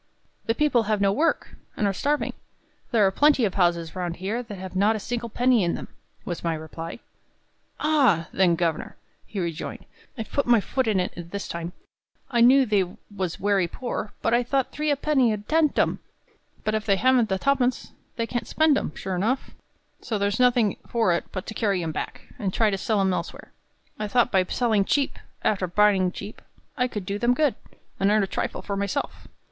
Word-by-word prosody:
"The 225 - +2
people 290 -3 +3
have 215 -1 +2
no 200 -1 +3
work, 305 +11 0 0.3
and 210 - +1
are 200 - +1
starving; 290 +9 0 0.6
there 220 -4 +4
are 190 - +3
plenty 285 +2 +4
of 195 - -1
houses 170 -3 +1
round 175 -2 -3
here 200 +7 -3
that 220 -5 -8
have 190 0 -8
not 205 +4 +3
a - - -3
single 235 +2 -4
penny 245 -1 +3
in 170 - 0
them," - - -7 0.4
was 175 - -4
my 165 -1 0
reply. 160 +1 -7 0.8
"Ah! 260 - +3
then, 180 -3 +4
governor," 165 -2 -2 0.3
he 205 - -5
rejoined, 170 -2 -4 0.3
"I've 220 -2 -6
put 280 - 0
my 240 -2 +6
foot 260 +4 -1
in 210 -4 +2
it 180 - -2 0.2
this 200 +2 -5
time; 170 +1 -5 0.6
I 240 -2 +2
knew 260 +3 +7
they 205 -4 +2 0.3
was 185 -4 -3
werry 195 -3 +2
poor, 230 +1 -5
but 230 - +2
I 240 - +4
thought 260 +2 0
three 300 0 -2
a 290 - +3
penny 270 -4 +2
'ud 210 -1 -4
tempt 310 -2 +2
'em. - - +2 0.6
But 215 - 0
if 215 -1 0
they 200 - +4
haven't 245 +1 +3
the 190 - +1
ha 275 +8 +3
pence, 255 -2 -1 0.2
they 230 - -1
can't 240 +1 -3
spend 315 -2 +3
'em, - - -5
sure 190 -1 -4
enough; 225 +9 -1 0.5
so 220 - -2
there's 200 +2 0
nothing 245 -4 +3
for 225 -7 +2
it 170 - -1
but 185 - -5
to - - -6
carry 200 -5 0
'em 160 - -2
back, - - -5 0.2
and 195 -2 -1
try 220 +3 +2
and 195 -1 -2
sell 210 0 +1
'em 190 -1 +2
elsewhere. - - -5 0.5
I 210 - -2
thought 245 +3 +2
by 190 -2 +4
selling 220 -1 +1
cheap, 280 +7 0 0.3
arter 195 -3 +1
buying 190 0 +3
cheap, 200 +3 -9 0.3
I 250 - +1
could 210 -6 -5
do 200 +2 -3
them 240 +2 +3
good, 295 -1 +2 0.5
and 195 - +3
earn 210 0 +4
a - - +2
trifle 190 - -3
for 200 - -3
myself. 200 +8 -3
210 Hz, 205 wpm, -25 LUFS, 190-245 Hz, 0.8 s, knew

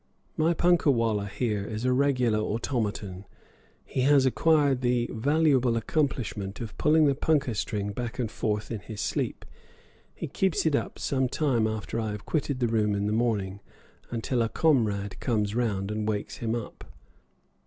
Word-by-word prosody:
My 165 +2 +2
punkah 175 -2 +3
wallah 110 -5 0
here 105 -1 -2
is 110 +3 -4
a 130 - +3
regular 125 -5 +2
automaton 105 -4 -2 0.6
he 130 - -2
has 140 0 +5
acquired 140 -1 +3
the 120 -1 +1
valuable 130 -1 +2
accomplishment 115 -6 -2
of 115 -3 -6
pulling 155 +1 +4
the 140 - +4
punkah 140 -3 +1
string 105 -1 -2
back 120 +2 -5
and 115 -4 -2
forth 105 0 -2
in 115 - -3
his 105 0 -9
sleep; - - -2 0.7
he - - -5
keeps 190 -5 0
it 155 -3 +3
up - - -2
some 130 -2 0
time 125 -7 +1
after 110 +1 -3
I 110 -2 -2
have 105 - -8
quitted 145 -4 -1
the 120 - +3
room 105 -2 +1
in 100 0 -1
the 105 - 0
morning, 105 -4 0 0.5
until 120 +1 -1
a 115 - +1
comrade 110 -8 +1
comes 105 -4 0
round 105 -4 -1
and 105 0 -2
wakes 105 -1 -3
him 115 0 -1
up. 115 - -6
115 Hz, 165 wpm, -27 LUFS, 105-135 Hz, 0.7 s, has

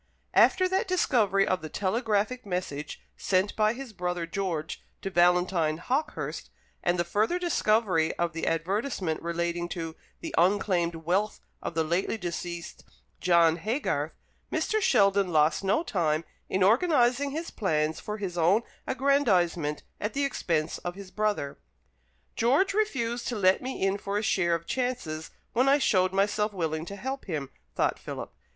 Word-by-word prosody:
After 370 -1 +5
that 380 +1 0
discovery 215 - +3
of 185 - 0
the 155 - -6
telegraphic 215 - 0
message 180 -6 -4 0.2
sent 190 +1 +1
by 215 0 +3
his 255 -2 -8
brother 180 -2 -2
George 170 -3 -3 0.2
to 195 - -3
Valentine 175 -3 +3
Hawkehurst, 260 - -3 0.3
and 175 +1 +1
the 175 - +2
further 210 - +1
discovery 215 - +2
of 170 -1 0
the 165 - -3
advertisement 180 - -1
relating 170 +1 -2
to 165 -2 -5 0.3
the - - -6
unclaimed 175 -2 +2
wealth 180 +6 -1 0.2
of 165 - -5
the 165 - +2
lately 175 +7 0
deceased 175 -2 -5 0.4
John 170 -2 +4
Haygarth, 220 - -1 0.4
Mr. 435 0 0
Sheldon 200 - +3
lost 155 +2 +3
no 200 - +2
time 165 - 0 0.3
in 190 0 +1
organizing 250 - +3
his 320 +4 -4
plans 155 -6 0
for 210 0 -5
his 185 -4 -4
own 190 +8 +4 0.2
aggrandizement 185 - +1 0.2
at 210 +1 -3
the 280 0 +1
expense 165 - -1
of 175 0 -5
his 195 -1 -10
brother. 210 -10 -1 0.8
"George 275 - +3
refused 245 - -1
to 245 - -2
let 190 -2 +3
me 260 +1 -5
in 195 +1 +1
for 200 0 -2
a 210 - -1
share 175 -5 +2
of 170 0 -5
chances 245 -13 -3 0.2
when 255 +3 +3
I 280 - +6
showed 185 -9 +2
myself 205 +2 +1
willing 160 -3 -2
to 200 - -6
help 265 +6 -5
him," 150 -7 -4 0.2
thought - - +1
Philip. - - -7
195 Hz, 155 wpm, -28 LUFS, 170-230 Hz, 0.8 s, I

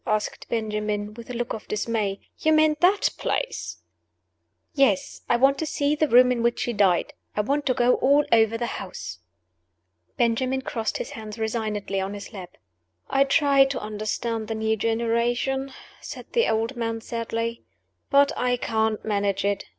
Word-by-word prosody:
asked 215 -1 -2
Benjamin, 210 -2 -2
with 230 +2 -11
a - - -4
look 240 0 -2
of 220 - -7
dismay. 210 -2 -1 0.2
"You 315 - +3
mean 310 0 +4
that 380 +4 +3
place?" - - -3 0.9
"Yes. 270 - +1
I - - +4
want 270 +2 +4
to 320 - -1
see 285 0 0
the 305 +1 +1
room 250 0 +6
in 240 -2 0
which 235 0 +1
she 240 - -1
died; 195 -5 +2 0.2
I 210 - +2
want 285 +7 -1
to 255 - +2
go 245 0 +4
all 285 +2 +4
over 225 0 +4
the 240 - -2 0.2
house." 180 - -7 1.0
Benjamin 255 +3 +1
crossed 225 -4 -2
his - - -5
hands 215 -1 -8
resignedly 215 -3 -2
on 195 +2 -4
his 200 +1 -9
lap. 180 -3 -9 0.5
"I 275 0 +4
try 275 0 +5
to 270 0 -3
understand 215 +1 -3
the 225 - -3
new 220 0 0
generation," 235 +4 0 0.3
said - - -8
the 470 -1 +3
old 225 +4 0
man, 230 -1 -2
sadly; 230 0 -3 0.5
"but 280 0 +5
I 245 0 +1
can't 220 -2 -1
manage 200 -2 0
it. 200 -1 0
230 Hz, 165 wpm, -25 LUFS, 215-265 Hz, 1.0 s, room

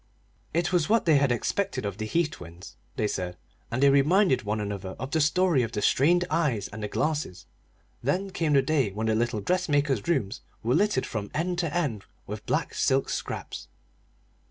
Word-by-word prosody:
It 170 +2 0
was 170 -4 +2
what 225 0 +3
they 160 -4 +5
had 140 -2 +2
expected 120 - -1
of 100 0 -4
the 110 - -3
Heath 165 +5 +1
twins, 85 +2 -11 0.2
they 110 -6 0
said, 90 -3 -4 0.3
and 130 +4 -1
they 140 - +7
reminded 145 +1 +4
one 105 -1 -2
another 100 -2 -4
of 130 +3 -6
the 160 - +2
story 165 -1 +3
of 115 -1 -3
the 105 - -2
strained 175 +6 +3
eyes 150 - 0
and 110 +1 -8
the 105 - -2
glasses. 150 - -2 0.6
Then 185 +10 -1
came 165 -5 0
the 135 -1 +5
day 135 -5 +1
when 105 +3 -4
the 110 - +2
little 115 -1 0
dressmaker's 145 - +1
rooms 135 - 0 0.2
were 120 +2 +1
littered 210 +5 +2
from 105 -2 -4
end 175 +3 -1
to 170 -4 -1
end 145 - -1 0.2
with - - -7
black - - 0
silk 135 0 +1
scraps. - - -5
135 Hz, 190 wpm, -27 LUFS, 110-170 Hz, 0.6 s, they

